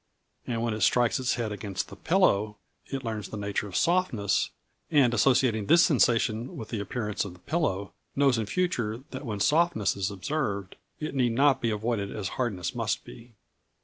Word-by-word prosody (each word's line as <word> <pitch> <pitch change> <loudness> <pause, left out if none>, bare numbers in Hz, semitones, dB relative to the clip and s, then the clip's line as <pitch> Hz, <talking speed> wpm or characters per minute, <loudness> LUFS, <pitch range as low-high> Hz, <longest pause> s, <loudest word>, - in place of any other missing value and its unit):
And 115 -2 -1
when 115 -2 0
it 105 - -4
strikes 120 +5 +3
its 125 -1 0
head 115 -3 -2
against 100 -3 -4
the - - -9
pillow, 110 - +2 0.3
it 135 -1 -4
learns 110 -3 -4
the 110 - -6
nature 100 0 -2
of 95 - -9
softness, 165 - +1 0.4
and 135 -6 +4
associating 120 -3 +3
this 170 +7 +7
sensation 120 -4 +2
with 110 - -7
the 110 - -3
appearance 105 +1 -2
of 100 -3 -7
the 90 - -17
pillow, 100 - -1 0.2
knows 135 -4 +3
in 110 - -2
future 125 - -1
that 135 +1 -6
when 105 -2 -3
softness 155 - +2
is 100 0 -1
observed 100 -2 -3 0.2
it 155 -1 -4
need 125 -4 +1
not 135 +1 +3
be 115 - +1
avoided 105 -1 -1
as 100 -3 -4
hardness 105 -10 -2
must 115 -2 -1
be. 115 0 -13
115 Hz, 180 wpm, -28 LUFS, 105-135 Hz, 0.4 s, this